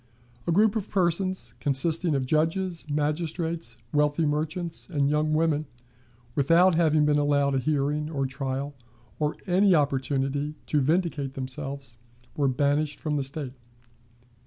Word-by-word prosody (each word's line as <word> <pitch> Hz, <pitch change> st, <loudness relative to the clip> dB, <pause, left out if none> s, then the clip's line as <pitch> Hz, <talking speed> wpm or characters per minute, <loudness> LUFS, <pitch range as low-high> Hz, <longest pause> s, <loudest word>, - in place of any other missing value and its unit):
A -, -, +2 dB
group 210 Hz, +5 st, +3 dB
of 215 Hz, -2 st, -3 dB
persons, 185 Hz, 0 st, 0 dB
consisting 155 Hz, +4 st, +2 dB
of 135 Hz, -2 st, 0 dB
judges, 165 Hz, +4 st, 0 dB
magistrates, 155 Hz, -2 st, -2 dB, 0.2 s
wealthy 150 Hz, +2 st, +2 dB
merchants, 160 Hz, +4 st, -2 dB
and 145 Hz, -4 st, +1 dB
young 155 Hz, +1 st, +1 dB
women, 155 Hz, -2 st, +1 dB, 0.7 s
without 165 Hz, +7 st, +4 dB
having 155 Hz, -2 st, +3 dB
been 150 Hz, 0 st, +3 dB
allowed 145 Hz, -1 st, +2 dB
a 135 Hz, -, +2 dB
hearing, 150 Hz, +2 st, -1 dB
or 140 Hz, -4 st, -1 dB
trial, 135 Hz, +1 st, -4 dB, 0.5 s
or 150 Hz, 0 st, 0 dB
any 190 Hz, 0 st, +4 dB
opportunity 140 Hz, 0 st, 0 dB
to 150 Hz, -, +1 dB
vindicate 150 Hz, -2 st, 0 dB
themselves, 135 Hz, -2 st, -4 dB, 0.4 s
were 145 Hz, -2 st, +1 dB
banished 145 Hz, +3 st, 0 dB
from 150 Hz, -1 st, -2 dB
the 140 Hz, -, 0 dB
State. 135 Hz, -1 st, -3 dB
150 Hz, 135 wpm, -26 LUFS, 140-165 Hz, 0.7 s, without